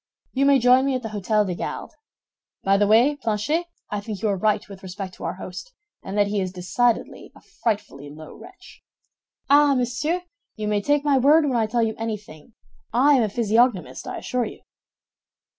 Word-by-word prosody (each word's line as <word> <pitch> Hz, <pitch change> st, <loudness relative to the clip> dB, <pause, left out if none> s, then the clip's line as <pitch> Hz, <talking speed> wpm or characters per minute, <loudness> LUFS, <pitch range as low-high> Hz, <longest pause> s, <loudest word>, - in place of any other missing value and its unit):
You 275 Hz, +1 st, +2 dB
may 280 Hz, -1 st, +6 dB
join 255 Hz, +1 st, +4 dB
me 270 Hz, -, +1 dB
at 255 Hz, -, -3 dB
the 225 Hz, -, -4 dB
Hôtel 210 Hz, 0 st, 0 dB
des 185 Hz, -, -2 dB
Gardes. -, -, -6 dB, 0.7 s
By 195 Hz, 0 st, +3 dB
the 205 Hz, +1 st, +3 dB
way, 240 Hz, +8 st, +4 dB
Planchet, 280 Hz, +8 st, -1 dB, 0.2 s
I 205 Hz, -, -2 dB
think 205 Hz, -1 st, -6 dB
you 215 Hz, -, +2 dB
are 200 Hz, -, +1 dB
right 210 Hz, +2 st, 0 dB
with 195 Hz, -2 st, -11 dB
respect 190 Hz, 0 st, -7 dB
to -, -, -12 dB
our -, -, -3 dB
host, 185 Hz, -, -9 dB, 0.3 s
and 195 Hz, +2 st, -6 dB
that 205 Hz, -, +4 dB
he 200 Hz, 0 st, -1 dB
is 185 Hz, -1 st, -3 dB
decidedly 190 Hz, +7 st, -1 dB
a -, -, -16 dB, 0.2 s
frightfully 205 Hz, -11 st, -2 dB
low 155 Hz, +2 st, -11 dB
wretch." -, -, -15 dB, 0.7 s
"Ah, 285 Hz, 0 st, +5 dB
monsieur, 255 Hz, +8 st, -1 dB, 0.3 s
you 215 Hz, -1 st, -4 dB
may 210 Hz, -1 st, +1 dB
take 290 Hz, +5 st, +1 dB
my 280 Hz, -2 st, +3 dB
word 300 Hz, +5 st, +5 dB
when 265 Hz, -3 st, 0 dB
I 225 Hz, -2 st, +1 dB
tell 235 Hz, +1 st, 0 dB
you 220 Hz, -1 st, 0 dB
anything. 210 Hz, -4 st, -7 dB, 0.4 s
I 265 Hz, +6 st, +4 dB
am 265 Hz, -, +4 dB
a 215 Hz, -, +1 dB
physiognomist, 230 Hz, -1 st, +1 dB
I -, -, -5 dB
assure 250 Hz, -1 st, -2 dB
you." -, -, -10 dB
220 Hz, 195 wpm, -23 LUFS, 200-260 Hz, 0.7 s, may